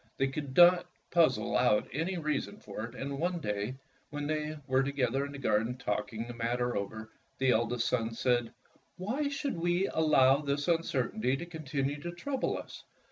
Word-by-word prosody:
They 135 0 +2
could 135 -1 -5
not 175 0 +7 0.2
puzzle 125 -12 +3
out 105 0 +3
any 165 +7 -1
rea 150 -3 0
son 100 - -9
for 105 +1 -6
it, 120 +1 -10
and 140 +1 -4
one 175 +1 0
day, 105 -1 -2 0.3
when, 145 0 -4
they 155 0 -2
were 130 -1 +3
to 135 +1 -1
gether 135 -1 0
in - - -9
the 140 - -7
garden 115 -1 +1
talking 110 -2 -3
the 120 - -7
matter 120 +1 -1
over, 110 +2 -4 0.3
the 130 -1 +3
eldest 120 +1 +1
son 115 -3 +1
said: 120 0 +1 0.5
"Why 250 +11 -1
should 280 0 -2
we 175 +2 +2
allow 140 -4 +5
this 145 0 -2
uncertainty 135 -7 +1
to 170 - -6
continue 145 -4 -3
to 175 +2 -4
trouble 265 +9 -2
us? - - -9
135 Hz, 185 wpm, -31 LUFS, 120-160 Hz, 0.5 s, not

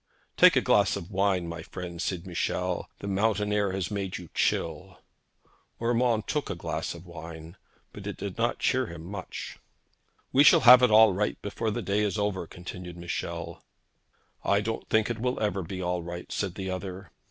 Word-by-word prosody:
'Take - - +7
a - - +4
glass - - +3
of 85 +5 -7
wine, 95 -2 +1
my 85 +1 -6
friend,' 85 0 -7
said 90 -2 -2
Michel. 90 -2 -2
'The 100 - -5
mountain 105 +1 +1
air 100 -2 +1
has 95 +1 -3
made 100 -2 -3
you 85 -3 -11
chill.' 85 +3 -1 0.8
Urmand 115 -2 +1
took 150 -3 -1
the 100 - -3
glass 85 - -4
of 85 +1 -11
wine, 80 0 -9 0.4
but - - -8
it - - -5
did 100 -2 -5
not 120 +1 0
cheer 130 -2 +1
him 85 -3 -9
much. 95 +1 -7 0.7
'We 140 - +7
shall - - +7
have 125 +1 +10
it 125 - +5
all 110 -1 +7
right 105 +3 -1
before 110 +2 -2
the 105 - -3
day 100 +1 +1
is 105 0 0
over,' 100 -4 -1
continued 90 +1 -8
Michel. 85 -1 -5 0.8
'I 100 +1 +3
don't 110 +1 -4
think 110 -1 +3
it 115 - -4
will 125 +2 -1
ever 105 -2 0
be 95 +1 -5
all 90 0 -1
right,' 85 +1 -7
said 95 -4 -2
the 95 -1 -4
other. 95 +1 -6
95 Hz, 185 wpm, -28 LUFS, 85-105 Hz, 0.8 s, have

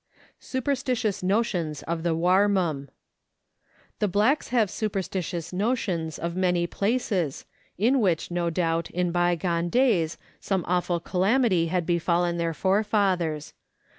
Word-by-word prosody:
Superstitious 255 -5 -1
Notions 185 -6 0
of 165 0 -3
the 165 -1 0
Warmum. 180 -5 +2 1.1
The 210 - +2
blacks 210 +10 +2
have 230 -5 +1
superstitious 185 -4 -3
notions 185 -6 -1
of 170 +1 -4
many 180 -2 +1
places, 200 - -1 0.3
in 245 +7 +3
which, 180 -6 0
no 175 -1 0
doubt, 165 -1 -1
in 180 0 -1
bygone 175 0 0
days 210 -9 +2 0.2
some 190 -3 -1
awful 175 -1 0
calamity 190 0 +2
had 175 0 -1
befallen 170 0 +1
their 165 -1 -1
fore 195 +6 +2
fathers. 180 -8 0
180 Hz, 120 wpm, -26 LUFS, 170-205 Hz, 1.1 s, in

